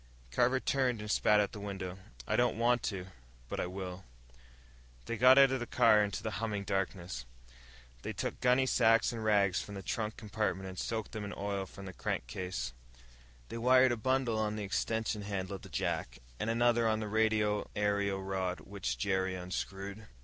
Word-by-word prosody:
Carver 125 Hz, -, +3 dB
turned 130 Hz, -4 st, +1 dB
and 105 Hz, 0 st, -4 dB
spat 105 Hz, -1 st, +4 dB
out 105 Hz, -, +1 dB
the 105 Hz, -, -8 dB
window. 95 Hz, -2 st, -5 dB, 0.3 s
"I -, -, +1 dB
don't 120 Hz, -2 st, +2 dB
want 120 Hz, +1 st, +3 dB
to, 95 Hz, -3 st, -3 dB, 0.4 s
but -, -, -4 dB
I -, -, -1 dB
will." 90 Hz, 0 st, -6 dB, 1.0 s
They 115 Hz, -, -2 dB
got 130 Hz, +3 st, +7 dB
out 135 Hz, -1 st, +8 dB
of 130 Hz, -, 0 dB
the 120 Hz, -, -4 dB
car, 105 Hz, -1 st, +5 dB
into 100 Hz, -, -3 dB
the 110 Hz, -, -2 dB
humming 105 Hz, -3 st, -2 dB
darkness. 90 Hz, -9 st, -3 dB, 0.7 s
They -, -, -4 dB
took -, -, -4 dB
gunny 125 Hz, +1 st, +4 dB
sacks 115 Hz, -3 st, +4 dB
and 115 Hz, -2 st, -5 dB
rags 100 Hz, -4 st, +3 dB
from 100 Hz, -, -8 dB
the 95 Hz, -, -6 dB
trunk 105 Hz, +3 st, -2 dB
compartment 105 Hz, -4 st, -2 dB
and 95 Hz, -1 st, -7 dB
soaked 110 Hz, -2 st, -3 dB
them 110 Hz, -2 st, -5 dB
in 100 Hz, -, -5 dB
oil 100 Hz, -1 st, -2 dB
from 100 Hz, -, -10 dB
the 95 Hz, -, -7 dB
crankcase. 65 Hz, -2 st, -3 dB, 0.8 s
They 115 Hz, -, -5 dB
wired 130 Hz, +2 st, +6 dB
a -, -, +1 dB
bundle 120 Hz, -1 st, +1 dB
on 105 Hz, -1 st, 0 dB
the 105 Hz, -, -3 dB
extension 110 Hz, +2 st, -1 dB
handle 100 Hz, -1 st, -3 dB
of -, -, -19 dB
the -, -, -11 dB
jack, -, -, -2 dB, 0.2 s
and 115 Hz, -, -1 dB
another 120 Hz, 0 st, +3 dB
on 110 Hz, 0 st, +2 dB
the 110 Hz, -, -3 dB
radio 105 Hz, -1 st, +1 dB
aerial 100 Hz, -1 st, 0 dB
rod 95 Hz, -1 st, -2 dB
which 100 Hz, 0 st, -4 dB
Jerry 95 Hz, -1 st, 0 dB
unscrewed. 95 Hz, +3 st, -5 dB
105 Hz, 185 wpm, -32 LUFS, 95-115 Hz, 1.0 s, out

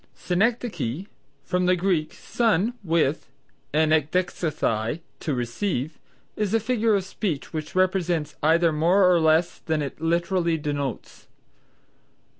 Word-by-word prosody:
Synecdoche 185 Hz, -, -1 dB, 0.4 s
(from 180 Hz, 0 st, 0 dB
the 185 Hz, -, +4 dB
Greek, 175 Hz, -4 st, 0 dB
sun 225 Hz, -1 st, +1 dB
with, 160 Hz, -4 st, 0 dB, 0.4 s
and 155 Hz, +1 st, +2 dB
ekdexesthai, 155 Hz, -6 st, 0 dB, 0.2 s
to 150 Hz, -, -2 dB
receive), 125 Hz, -, -3 dB, 0.4 s
is 210 Hz, 0 st, 0 dB
a -, -, +4 dB
figure 225 Hz, -1 st, +1 dB
of 195 Hz, -, 0 dB
speech 185 Hz, -7 st, -4 dB
which 155 Hz, 0 st, -5 dB
expresses 180 Hz, -5 st, +1 dB
either 165 Hz, +2 st, +4 dB
more 175 Hz, +5 st, +4 dB
or 180 Hz, -1 st, +5 dB
less 160 Hz, +2 st, +2 dB
than 160 Hz, -2 st, -1 dB
it 140 Hz, +2 st, -7 dB
literally 170 Hz, 0 st, +1 dB
denotes. 145 Hz, -4 st, -4 dB
170 Hz, 120 wpm, -24 LUFS, 155-185 Hz, 0.4 s, or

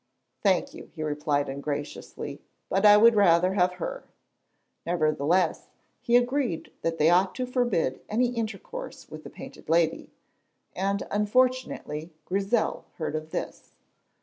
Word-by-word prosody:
"Thank 190 Hz, -4 st, +2 dB
you," -, -, -11 dB
he 155 Hz, -, -4 dB
replied 145 Hz, -1 st, 0 dB
ungraciously, 140 Hz, +2 st, -5 dB, 0.3 s
"but 195 Hz, +3 st, +4 dB
I 205 Hz, 0 st, +9 dB
would 230 Hz, +2 st, +7 dB
rather 180 Hz, -2 st, +4 dB
have 180 Hz, -2 st, +2 dB
her." -, -, -5 dB, 0.8 s
Nevertheless 165 Hz, +1 st, +1 dB, 0.3 s
he 240 Hz, -, +2 dB
agreed 245 Hz, -, -1 dB
that 165 Hz, 0 st, -2 dB
he 155 Hz, -, +4 dB
ought 180 Hz, +3 st, +3 dB
to 255 Hz, -, -2 dB
forbid 245 Hz, -, 0 dB
any 240 Hz, +3 st, +2 dB
intercourse 235 Hz, -, -6 dB
with -, -, -9 dB
the -, -, -9 dB
Painted -, -, -12 dB
Lady, 165 Hz, 0 st, +1 dB, 0.7 s
and 195 Hz, +1 st, -1 dB
unfortunately 210 Hz, -8 st, 0 dB
Grizel 195 Hz, +5 st, 0 dB
heard 155 Hz, -2 st, -3 dB
of 155 Hz, 0 st, -4 dB
this. -, -, -6 dB
185 Hz, 130 wpm, -27 LUFS, 160-235 Hz, 0.8 s, I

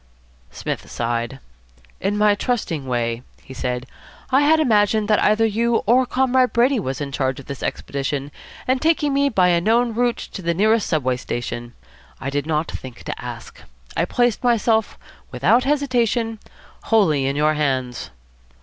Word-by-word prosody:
Psmith -, -, -5 dB
sighed. 120 Hz, +2 st, -2 dB, 0.6 s
"In 200 Hz, +2 st, -1 dB
my 210 Hz, 0 st, +4 dB
trusting 200 Hz, -, -2 dB
way," 120 Hz, -1 st, -1 dB, 0.2 s
he 130 Hz, -, -11 dB
said, 125 Hz, -1 st, -3 dB, 0.5 s
"I 265 Hz, +2 st, +5 dB
had 315 Hz, +2 st, +4 dB
imagined 215 Hz, -5 st, +3 dB
that 210 Hz, -, +4 dB
either 215 Hz, +2 st, +3 dB
you 230 Hz, +2 st, +1 dB
or 250 Hz, +3 st, +4 dB
Comrade 255 Hz, 0 st, +2 dB
Brady 245 Hz, +2 st, +3 dB
was 135 Hz, -8 st, -3 dB
in 145 Hz, -2 st, -4 dB
charge 130 Hz, -1 st, -1 dB
of 140 Hz, -, -11 dB
this 140 Hz, -2 st, -7 dB
expedition 140 Hz, 0 st, -3 dB, 0.4 s
and 255 Hz, 0 st, +1 dB
taking 310 Hz, -3 st, +2 dB
me 280 Hz, +1 st, +3 dB
by 185 Hz, -7 st, +3 dB
a 170 Hz, -1 st, +3 dB
known 230 Hz, +4 st, +2 dB
route 240 Hz, +1 st, +1 dB, 0.2 s
to 195 Hz, -, -6 dB
the 170 Hz, -1 st, -1 dB
nearest 215 Hz, +3 st, +2 dB
Subway 130 Hz, -6 st, 0 dB
station. 120 Hz, -1 st, -5 dB, 0.4 s
I 140 Hz, -, -4 dB
did 145 Hz, +1 st, -2 dB
not 155 Hz, 0 st, -1 dB
think 130 Hz, -2 st, -9 dB
to -, -, -6 dB
ask. -, -, -8 dB, 0.3 s
I -, -, +1 dB
placed 240 Hz, -2 st, 0 dB
myself, 225 Hz, -2 st, +2 dB, 0.3 s
without 190 Hz, -, +2 dB
hesitation, 245 Hz, -5 st, 0 dB, 0.5 s
wholly 160 Hz, -12 st, +3 dB
in 135 Hz, -, -1 dB
your 150 Hz, +1 st, +2 dB
hands." 130 Hz, -5 st, -2 dB
205 Hz, 160 wpm, -21 LUFS, -, 0.6 s, I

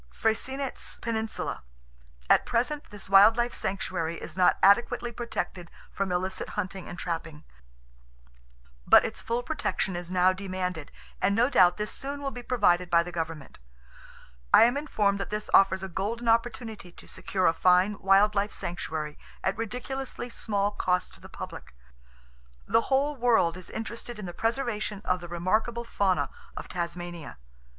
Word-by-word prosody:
Freycinet's 260 Hz, -, -2 dB
Peninsula.—At -, -, -2 dB
present 255 Hz, +5 st, -1 dB
this 205 Hz, -1 st, -9 dB
wild 195 Hz, +4 st, +7 dB
life 240 Hz, 0 st, 0 dB
sanctuary 180 Hz, -4 st, -3 dB
is 155 Hz, -, -8 dB
not 185 Hz, -1 st, +4 dB
adequately 235 Hz, +4 st, +4 dB
protected 205 Hz, -7 st, -4 dB, 0.2 s
from 195 Hz, -1 st, -2 dB
illicit 185 Hz, +2 st, -2 dB
hunting 190 Hz, -2 st, -4 dB
and 175 Hz, -, -7 dB
trapping; 165 Hz, -3 st, -5 dB, 1.4 s
but -, -, +7 dB
its -, -, -4 dB
full 235 Hz, +1 st, -2 dB
protection 190 Hz, -, -2 dB
is 175 Hz, 0 st, -5 dB
now 185 Hz, 0 st, +4 dB
demanded, 185 Hz, -4 st, -4 dB, 0.3 s
and 200 Hz, +2 st, +2 dB
no 240 Hz, +5 st, +3 dB
doubt 180 Hz, -5 st, +5 dB
this 210 Hz, 0 st, -3 dB
soon 280 Hz, +1 st, -5 dB
will 275 Hz, -1 st, -3 dB
be 245 Hz, -, -7 dB
provided 180 Hz, -8 st, +2 dB
by 170 Hz, -1 st, +4 dB
the 175 Hz, -, -7 dB
government. 165 Hz, -3 st, -5 dB, 0.9 s
I -, -, +8 dB
am 240 Hz, +3 st, +4 dB
informed 210 Hz, -9 st, 0 dB
that 195 Hz, -, -4 dB
this 210 Hz, 0 st, -4 dB
offers 190 Hz, -1 st, +5 dB
a -, -, -3 dB
golden 215 Hz, +6 st, -3 dB
opportunity 225 Hz, -4 st, 0 dB
to -, -, -13 dB
secure 185 Hz, -2 st, -2 dB
a 165 Hz, -, +5 dB
fine 185 Hz, +4 st, +3 dB
wild 195 Hz, +2 st, +4 dB
life 205 Hz, +1 st, 0 dB
sanctuary 155 Hz, -3 st, -5 dB, 0.2 s
at 190 Hz, -, +1 dB
ridiculously 250 Hz, +2 st, -5 dB
small 205 Hz, -3 st, -1 dB
cost 180 Hz, -3 st, -1 dB
to -, -, -13 dB
the -, -, -12 dB
public. -, -, -9 dB, 0.9 s
The -, -, +3 dB
whole 280 Hz, +2 st, +2 dB
world 230 Hz, -9 st, +3 dB
is 185 Hz, -1 st, -9 dB
interested 230 Hz, +1 st, -6 dB
in 210 Hz, -, -6 dB
the 175 Hz, -, -6 dB
preservation 225 Hz, -2 st, -2 dB
of 180 Hz, 0 st, +1 dB
the 175 Hz, -, -8 dB
remarkable 215 Hz, +8 st, 0 dB
fauna 200 Hz, -5 st, 0 dB, 0.3 s
of -, -, -6 dB
Tasmania. 175 Hz, -, -5 dB
195 Hz, 155 wpm, -28 LUFS, 175-230 Hz, 1.4 s, I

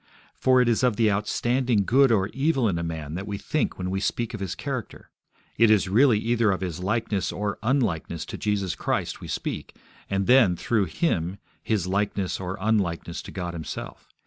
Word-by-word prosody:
For 130 Hz, -1 st, +3 dB
it 125 Hz, -, +2 dB
is 115 Hz, -2 st, +2 dB
of 125 Hz, -4 st, +3 dB
the 110 Hz, -1 st, +3 dB
outstanding 120 Hz, +2 st, +1 dB
good 135 Hz, +3 st, +5 dB
or 100 Hz, -3 st, +2 dB
evil 135 Hz, -1 st, +1 dB
in 90 Hz, -5 st, 0 dB
a -, -, -2 dB
man 80 Hz, -3 st, -5 dB
that 95 Hz, +4 st, -5 dB
we 100 Hz, -1 st, -3 dB
think 155 Hz, +8 st, -1 dB
when 90 Hz, 0 st, -3 dB
we 95 Hz, -, -1 dB
speak 115 Hz, +3 st, -2 dB
of 110 Hz, -, -5 dB
his 95 Hz, -2 st, -3 dB
character. 135 Hz, -6 st, -6 dB, 0.5 s
It 115 Hz, -1 st, +6 dB
is 105 Hz, -3 st, +4 dB
really 115 Hz, +4 st, +5 dB
either 115 Hz, 0 st, +1 dB
of 95 Hz, -1 st, 0 dB
his 90 Hz, -4 st, -3 dB
likeness 100 Hz, -1 st, -1 dB
or 100 Hz, +2 st, -3 dB
unlikeness 100 Hz, -, 0 dB
to -, -, -7 dB
Jesus 100 Hz, -4 st, 0 dB
Christ -, -, -2 dB
we -, -, -7 dB
speak, -, -, -4 dB, 0.3 s
and 95 Hz, 0 st, 0 dB
then, 120 Hz, -7 st, +5 dB
through 105 Hz, +3 st, +1 dB
Him, 90 Hz, -, -1 dB, 0.2 s
his 105 Hz, -6 st, 0 dB
likeness 100 Hz, 0 st, -1 dB
or 95 Hz, 0 st, -4 dB
unlikeness 95 Hz, -5 st, -1 dB
to -, -, -10 dB
God 90 Hz, -2 st, -4 dB
Himself. 80 Hz, -2 st, -7 dB
100 Hz, 195 wpm, -25 LUFS, 90-115 Hz, 0.5 s, It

